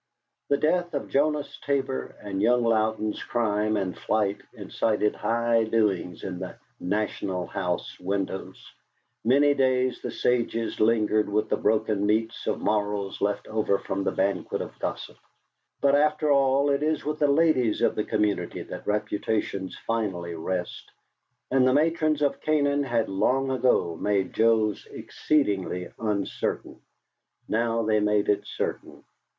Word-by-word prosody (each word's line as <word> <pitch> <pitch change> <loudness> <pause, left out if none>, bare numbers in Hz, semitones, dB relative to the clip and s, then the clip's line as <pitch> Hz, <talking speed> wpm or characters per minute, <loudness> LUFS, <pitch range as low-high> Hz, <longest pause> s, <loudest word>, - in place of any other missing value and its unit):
The 140 - +3
death 175 +2 0
of 140 - -3
Jonas 150 +1 0
Tabor 135 -2 -2
and 100 -2 -3
young 125 0 +3
Louden's 110 -1 0
crime 110 -2 0
and 95 -3 -2
flight 105 -2 -1
incited 105 -1 0
high 115 0 +1
doings 100 -6 0
in 90 -2 -5
the 95 -1 -6 0.2
"National 95 -2 -2
House" 90 -3 -3
windows; 95 0 -4 0.6
many 145 +5 +4
days 130 -2 +1
the - - -4
sages 115 -2 -1
lingered 110 -1 +2
with 105 +1 0
the - - +2
broken 105 -1 +1
meats 110 +2 0
of - - 0
morals 105 -1 -1
left 100 0 -1
over 110 -2 +1
from 95 0 -3
the - - 0
banquet 95 -1 -1
of - - -7
gossip. - - -5 0.6
But, 140 -1 +4
after 150 +1 +3
all, 140 +1 +3
it 140 0 +1
is 155 -1 0
with 150 +1 -2
the 145 - +4
ladies 140 -7 +2
of - - +2
a 105 - 0
community 105 -1 -1
that - - -9
reputations 105 -2 -2
finally 95 -7 -2
rest, 90 +2 -4 0.6
and 130 -1 +4
the 130 - +4
matrons 155 -1 +2
of 140 - 0
Canaan 145 -2 +2
had 120 -5 0
long 130 +8 +1
ago 125 -9 +2
made 100 0 0
Joe's 110 -2 +2
exceedingly 100 -11 -1
uncertain. 105 -3 -3 0.7
Now 115 +1 0
they 110 0 +2
made 105 0 +1
it 105 - +1
certain. - - -5
110 Hz, 140 wpm, -26 LUFS, 100-135 Hz, 0.7 s, many